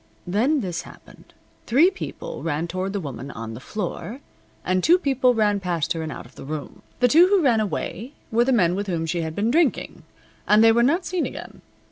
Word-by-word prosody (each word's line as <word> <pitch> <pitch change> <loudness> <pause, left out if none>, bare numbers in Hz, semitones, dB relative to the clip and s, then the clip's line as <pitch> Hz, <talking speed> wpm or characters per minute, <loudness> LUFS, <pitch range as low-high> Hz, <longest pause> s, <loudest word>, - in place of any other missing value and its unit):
Then 240 - +1
this 180 -5 -3
happened. - - -16 0.4
Three 305 +11 +5
people - - -7
ran 165 +1 -2
toward 185 +2 -3
the 200 - -2
woman 140 -5 -7
on 115 -3 -7
the 110 - -8
floor, 215 - -5 0.5
and 185 0 +1
two 350 - +6
people 265 -6 +2
ran 210 -2 +2
past 175 -5 -1
her 165 - -4
and 160 -1 -4
out - - -8
of 125 - -17
the - - -11
room. 150 +1 -7 0.2
The 250 - +6
two 330 +8 +6
who 390 -3 +3
ran 240 -5 +3
away 215 +4 -4 0.2
were 235 +2 +3
the 265 - +1
men 180 -8 +3
with 200 +2 -3
whom 170 -3 -2
she 170 +1 -2
had 160 -1 -4
been 215 +3 0
drinking, 315 -1 0 0.5
and 210 +1 +5
they 225 - +7
were 235 +1 +3
not 330 +9 +2
seen 360 -2 -1
again. - - -10
210 Hz, 215 wpm, -23 LUFS, 170-260 Hz, 0.5 s, they